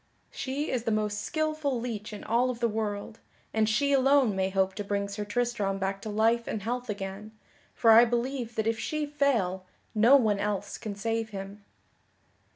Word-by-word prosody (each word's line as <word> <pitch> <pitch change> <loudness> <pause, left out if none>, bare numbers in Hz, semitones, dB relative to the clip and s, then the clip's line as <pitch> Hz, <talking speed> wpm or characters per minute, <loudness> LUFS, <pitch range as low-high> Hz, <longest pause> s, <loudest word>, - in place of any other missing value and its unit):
She 275 +3 -3
is 245 -2 -2
the - - +1
most 210 -1 0
skilful 310 -2 -1
leech 225 -3 -5
in 210 - -8
all 240 +3 +2
of 245 -2 -4
the 235 - +2
world, 215 0 -3 0.3
and 220 -1 +2
she 280 +6 +2
alone 270 -5 +4
may 190 0 0
hope 190 0 +1
to 205 - -4
bring 200 0 -1
Sir 200 +1 -4
Tristram 215 -3 -1
back 195 0 -2
to 215 - -6
life 225 +2 +2
and 210 - -3
health 245 +2 -3
again, 200 +1 -5 0.4
for 225 - +5
I 225 +2 +9
believe 240 0 -2
that 220 - 0
if 225 0 0
she 305 +5 -2
fail 245 -11 0 0.3
no 230 +5 +6
one 215 -7 +3
else 205 -1 -2
can 215 -3 -5
save 225 +2 -2
him." 200 0 -8
220 Hz, 185 wpm, -28 LUFS, 205-245 Hz, 0.4 s, I